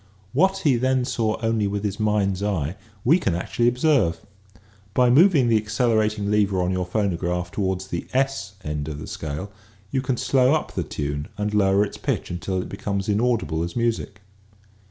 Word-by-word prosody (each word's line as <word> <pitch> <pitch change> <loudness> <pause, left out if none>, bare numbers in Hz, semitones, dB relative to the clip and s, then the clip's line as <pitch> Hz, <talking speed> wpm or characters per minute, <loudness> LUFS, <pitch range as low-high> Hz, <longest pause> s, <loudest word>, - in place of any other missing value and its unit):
What 190 +7 +2
he 140 -6 +4
then 130 +1 +1
saw 110 -4 -1
only 115 -2 +1
with 100 +1 -3
his 105 0 -2
mind's 105 -3 +1
eye 90 -6 -1 0.3
we 160 +9 +5
can 95 - 0
actually 120 +6 0
observe. 125 - +2 0.8
By 125 -1 +4
moving 150 -2 +5
the 115 -1 +4
accelerating 110 -1 +1
lever 100 -2 +2
on 90 - 0
your 90 -1 -1
phonograph 90 -3 -1
toward 95 -2 -1
the 95 -3 -5
S 130 -7 -1
end 75 -1 -3
of 75 -2 -5
the 75 - -7
scale 80 +6 -5 0.4
you 135 - 0
can 130 -1 -1
slow 130 +3 +3
up 155 - -3
the - - -1
tune 75 0 -4
and 105 0 -2
lower 100 0 +3
its 100 - -8
pitch - - -2
until 90 +2 -2
it - - -8
becomes 100 0 -3
inaudible 105 -7 +1
as 85 0 -5
music. 115 -4 -1
105 Hz, 175 wpm, -23 LUFS, 95-120 Hz, 0.8 s, we